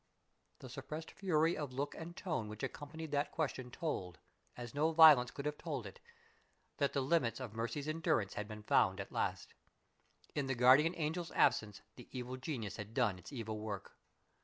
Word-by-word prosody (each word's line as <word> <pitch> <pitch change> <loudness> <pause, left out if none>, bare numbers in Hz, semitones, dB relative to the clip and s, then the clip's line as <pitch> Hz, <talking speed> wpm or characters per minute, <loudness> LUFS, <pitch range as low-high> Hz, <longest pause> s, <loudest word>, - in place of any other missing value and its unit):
_" - - -45
The 130 - -8
suppressed 145 +5 -6
fury 165 -3 +2
of 145 -4 -4
look 140 +3 -2
and 170 +1 -8
tone 155 - -2
which 105 0 -8
accompanied 155 +1 -6
that 145 0 0
question 135 -5 -2
told, 95 - -3 0.4
as 120 -1 -7
no 155 +3 +2
violence 155 -6 +9
could 140 - -7
have 150 0 -2
told 145 -9 -4
it, 100 - -10 0.8
that 140 -1 +1
the 140 - +1
limits 135 -4 +1
of 125 -5 -6
Mercy's 120 +6 -3
endurance 155 - +1
had 105 - -4
been 105 -1 -8
found 95 -2 +3
at 100 - -6
last. - - -2 0.8
In 140 -2 -1
the 135 - 0
guardian 135 +8 +6
angel's 165 +2 -2
absence 105 -2 +2
the 125 - -11
evil 125 0 -5
genius 130 -7 -4
had 105 +1 -8
done 105 -8 +2
its 90 - -11
evil 110 -5 -4
work. 105 -2 -6
135 Hz, 185 wpm, -36 LUFS, 110-155 Hz, 0.8 s, violence